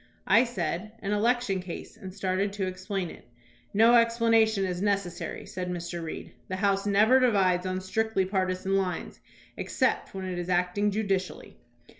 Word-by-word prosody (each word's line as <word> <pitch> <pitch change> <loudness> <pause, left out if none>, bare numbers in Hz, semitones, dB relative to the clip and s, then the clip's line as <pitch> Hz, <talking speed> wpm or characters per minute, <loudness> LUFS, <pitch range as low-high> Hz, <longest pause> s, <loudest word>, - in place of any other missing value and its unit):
I 225 +6 +5
said, 215 -4 -3
"An 200 - -2
election 210 -2 +1
case," 180 -2 -8
and 190 - -9
started 195 +1 -1
to 200 -2 -2
explain 185 -1 -4
it. - - -14 0.4
"No 225 +3 +5
explanation 230 -3 +4
is 180 -1 -3
necessary," 200 -3 -2
said 180 -1 -5
Mr. 175 -1 -4
Reed; 160 - -7
"the 185 - -3
House 195 +1 +1
never 215 +6 +5
divides 190 -7 +2
on 185 0 -2
strictly 210 +1 0
partisan 185 0 -1
lines 185 -2 -3 0.4
except - - -1
when 190 -1 -4
it 180 -1 -3
is 175 +1 -5
acting 180 +3 +1
judicially." 195 -3 -2
195 Hz, 155 wpm, -28 LUFS, 185-215 Hz, 0.4 s, I